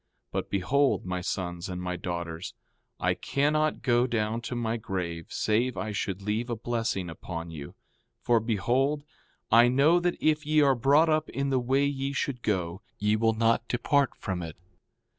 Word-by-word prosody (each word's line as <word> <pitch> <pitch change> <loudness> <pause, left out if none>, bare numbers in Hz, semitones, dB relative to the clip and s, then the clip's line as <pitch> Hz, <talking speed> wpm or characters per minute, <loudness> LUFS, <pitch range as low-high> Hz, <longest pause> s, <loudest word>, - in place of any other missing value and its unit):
4:5 - - -51 0.2
But - - -3
behold, 105 +3 +1
my 90 0 -2
sons 90 -1 -3
and 90 -1 -4
my 90 0 -3
daughters, 85 -1 -5 0.4
I - - +2
cannot 155 +2 0
go 120 -1 +3
down 115 -1 -1
to 120 +1 -5
my 115 -1 -1
grave 90 -7 -4
save 115 +4 0
I 110 - -3
should 100 -1 -3
leave 110 +4 -1
a 120 - -1
blessing 115 -5 -2
upon 85 0 -6
you; 75 -3 -8 0.4
for 120 -1 +3
behold, 125 +7 0 0.5
I 115 +2 +7
know 140 +8 +4
that 175 0 0
if 155 -1 +2
ye 155 0 +2
are 140 -2 +5
brought 140 +6 +4
up 155 0 +1
in 140 0 -2
the 130 - +3
way 135 +3 +2
ye 140 0 -2
should 135 -2 -2
go 95 -3 -1 0.2
ye 105 +1 +2
will 110 +1 +2
not 115 +1 +1
depart 140 +3 +1
from 95 -3 -4
it. 80 -2 -6
115 Hz, 180 wpm, -28 LUFS, 95-135 Hz, 0.5 s, I